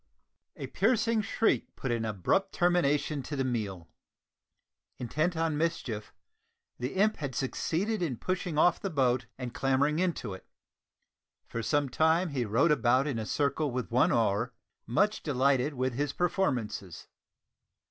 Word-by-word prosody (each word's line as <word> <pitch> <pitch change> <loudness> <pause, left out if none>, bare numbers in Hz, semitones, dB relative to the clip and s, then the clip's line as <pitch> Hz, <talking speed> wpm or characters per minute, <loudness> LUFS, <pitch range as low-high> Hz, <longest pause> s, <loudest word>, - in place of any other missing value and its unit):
A - - -6
piercing 225 0 +1
shriek 220 +2 0
put 130 - -3
an 115 -1 -1
abrupt 110 - 0
termination 155 -4 +1
to 145 - -5
the 135 - 0
meal! 105 -9 -3 1.1
Intent 155 +8 -1
on 160 -2 0
mischief; 125 -10 -2 0.7
the 125 +6 -3
imp 210 +3 +2
had 140 -4 -5
succeeded 185 - -1
in 145 -9 -1
pushing 180 -1 -2
off 175 +2 +4
the 195 - -2
boat 130 -6 +1
and 125 -2 -5
clambering 140 +4 +1
into 170 - -1
it. 95 - -11 1.0
For 115 - -4
some 145 +6 +1
time 160 +6 +2
he 130 -5 -1
rowed 115 +10 +3
about 130 -1 +3
in 135 -6 -2
a 110 - -4
circle 145 +1 0
with 125 -2 -4
one 125 +2 +4
oar, 115 +1 +1 0.3
much 205 - +1
delighted 140 0 +1
with 130 0 -1
his 140 +2 -1
performances. 125 - -1
140 Hz, 145 wpm, -30 LUFS, 120-170 Hz, 1.1 s, off